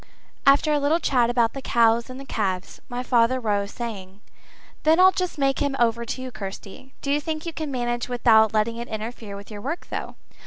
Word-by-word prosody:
After 285 +2 +5
a 295 - +2
little 295 +4 +2
chat 245 -7 +2
about 240 -2 +2
the 270 - -6
cows 230 -1 +2
and 255 +1 -8
the 275 - -9
calves, 190 -6 -3
my 245 +1 -4
father 245 +1 +3
rose, 205 -4 -1
saying 200 -5 -7 0.6
"Then 320 +2 +4
I'll 375 +1 +8
just 365 -2 -3
make 275 -1 +1
him 280 -1 0
over 235 -1 +1
to 255 - -4
you, 255 - -6
Kirsty. 200 +5 -9
Do 280 - -1
you 295 +1 +2
think 310 +1 -4
you 335 - -4
can 310 -1 -4
manage 240 -2 -2
without 220 -3 +4
letting 220 +2 0
it 235 0 -5
interfere 220 -1 -6
with 200 +2 -10
your 205 -1 -7
work, 305 +9 -4
though?" - - -5
240 Hz, 210 wpm, -24 LUFS, 220-275 Hz, 0.6 s, I'll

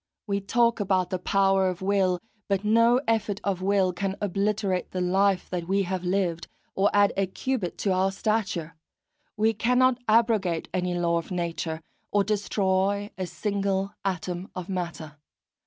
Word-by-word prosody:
We 200 -2 -1
talk 235 +3 +2
about 190 -3 +1
the 185 - -1
power 195 0 +2
of 180 - -4
the 190 - -7
will, 190 -2 +2 0.3
but 195 -1 0
no 230 +3 +5
effort 220 -3 0
of 190 -2 -1
will 190 -1 +2
can 195 +2 -2
obliterate 200 -1 -1
the 185 - -4
life 190 +1 +2
that 175 -2 -3
we 195 +1 +2
have 185 0 -3
lived, 180 -2 -1 0.3
or 195 +1 +3
add 205 0 +4
a 195 -1 +1
cubit 215 -1 -3
to 200 - 0
our 190 +1 +2
stature; 195 -6 -2 0.6
we 220 +1 +3
cannot 250 +3 +3
abrogate 215 -7 +2
any 180 -1 -1
law 170 -1 +1
of 165 - -9
nature, 170 -3 -3 0.3
or 205 -1 +2
destroy 200 -1 0
a 185 -1 -4
single 200 -1 -1
atom 180 -1 -3
of 185 0 -6
matter. 170 -5 -5
195 Hz, 160 wpm, -26 LUFS, 180-205 Hz, 0.6 s, no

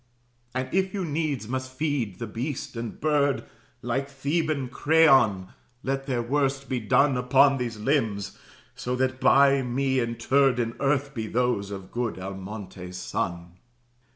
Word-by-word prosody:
"And 130 0 -1
if 190 +1 +1
you 190 -2 -1
needs 150 -6 -2
must 130 +1 -3
feed 130 - -2
the 115 - -4
beast 125 +5 -5
and 115 -1 -5
bird, 145 -3 +2 0.4
Like 130 +3 -1
Theban 140 0 -1
Creon, 130 - +4 0.3
let 135 +1 -2
their 125 -3 0
worst 135 +1 0
be 130 - -1
done 130 +4 +3
Upon 135 +2 +4
these 120 -3 -3
limbs; 110 -5 0 0.4
so 125 +1 -3
that 130 0 0
by 140 +1 +5
me 130 +1 0
interred 125 +2 +2
In 115 0 -1
earth 140 0 +1
be 110 -4 -4
those 120 -4 0
of 95 -2 -8
good 120 -4 -2
Almontes's 95 -1 -7
son." 85 -1 -4
130 Hz, 145 wpm, -26 LUFS, 115-140 Hz, 0.4 s, by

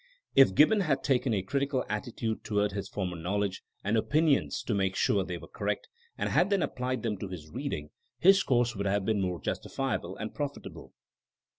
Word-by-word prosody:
If 135 -9 +6
Gibbon 205 +9 +6
had 150 -8 +1
taken 135 -2 +2
a 100 -4 0
critical 140 +4 -1
attitude 110 +1 -3
toward 105 -1 +1
his 100 -1 -4
former 90 -3 -3
knowledge 95 +3 -2 0.2
and 105 +3 +1
opinions 145 +5 +2
to 115 - -1
make 95 -2 0
sure 100 -2 +2
they 90 -1 -4
were 85 0 -11
correct, 105 0 -3 0.3
and - - -1
had 185 - +3
then 200 -4 +2
applied 125 -2 -2
them 105 -4 -2
to 100 - -4
his 80 -5 -9
reading, 110 - -4 0.3
his 195 +8 +6
course 120 -2 +2
would 100 0 -2
have 100 0 +1
been 110 -2 +1
more 90 -2 -1
justifiable 115 -9 -3
and 110 +1 -5
profitable. 145 -1 -6
110 Hz, 185 wpm, -29 LUFS, 95-135 Hz, 0.3 s, If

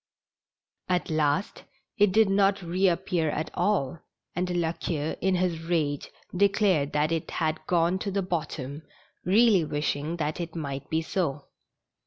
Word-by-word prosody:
At 180 -2 0
last 155 +3 0 0.3
it 205 -1 +4
did 220 +2 +5
not 195 0 +2
reappear 175 -2 +1
at 155 +1 -3
all, 170 -8 0 0.4
and 180 +1 -1
La 175 -2 0
Queue 160 -2 -3
in 190 +1 +2
his 175 -3 0
rage 160 -4 -1 0.3
declared 190 -6 +3
that 150 +2 +1
it 165 -1 -2
had 155 -2 -1
gone 175 +1 +2
to 205 - -3
the 195 0 -1
bottom, 155 -5 -4 0.4
really 205 -1 +5
wishing 150 +2 -2
tliat 155 0 -2
it 170 -1 -5
might 140 -4 -5
be 160 0 0
so. 150 -5 -2
170 Hz, 145 wpm, -27 LUFS, 155-185 Hz, 0.4 s, did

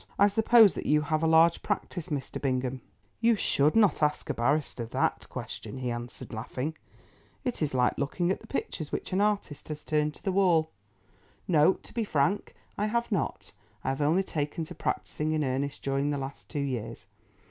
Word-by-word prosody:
I 200 +1 +6
suppose 220 -1 +6
that - - -5
you 150 +1 +4
have 155 +1 0
a 165 - +2
large 165 +1 +5
practice, 175 -4 -3
Mr. 140 -4 -4
Bingham?" 130 -1 -1 0.4
"You 230 0 +4
should 150 -6 +2
not 210 -7 +4
ask 150 0 +1
a - - -2
barrister 120 0 0
that - - -1
question," - - -6
he 125 -2 -2
answered, 120 +1 -7
laughing; 125 +7 -4 0.7
"it 250 -8 -3
is 150 -3 0
like 125 -1 +2
looking 175 +6 0
at - - -1
the - - -15
pictures 155 - -4
which - - -4
an 190 - +2
artist 205 -8 -1
has 150 -1 -6
turned 150 -1 +1
to - - -18
the 195 - 0
wall. 175 -5 +3 0.8
No, 160 0 +5
to - - -16
be 230 - 0
frank, 185 +1 0 0.2
I 210 - +1
have 235 +2 -1
not. 200 - -2 0.3
I - - -1
have 135 +2 -2
only 160 +6 +3
taken 150 -2 -3
to 155 - -8
practising 155 +1 -2
in 155 -1 +1
earnest 140 +2 -2
during 140 +1 0
the 145 - 0
last 135 0 -7
two 150 - -5
years. 115 -7 -4
150 Hz, 190 wpm, -29 LUFS, 135-185 Hz, 0.8 s, I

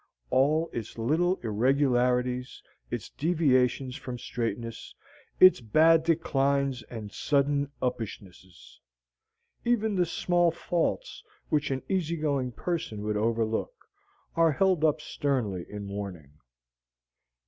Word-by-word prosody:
All 155 +5 +3
its 115 -1 -6
little 160 +10 +2
irregularities, 125 +1 +1 0.3
its - - -5
deviations 130 -6 +1
from 125 -1 -6
straightness, 115 -1 -5 0.4
its 185 -7 +7
bad 160 +8 +5
declines 140 -5 +1
and 110 -4 -7
sudden 140 +3 +1
uppishnesses, 100 -7 -6 0.8
even 220 -3 +1
the 180 -3 +1
small 175 0 +2
faults 175 - -2 0.3
which 150 -1 +1
an 135 -1 -2
easy 170 -4 -1
going 140 -5 -1
person 120 -7 -4
would 105 0 -1
overlook, 115 - 0 0.6
are 165 -2 +4
held 185 0 +2
up 155 -1 +2
sternly 115 -15 -2
in 105 -1 -6
warning. 100 -8 -6
135 Hz, 105 wpm, -28 LUFS, 115-160 Hz, 0.8 s, its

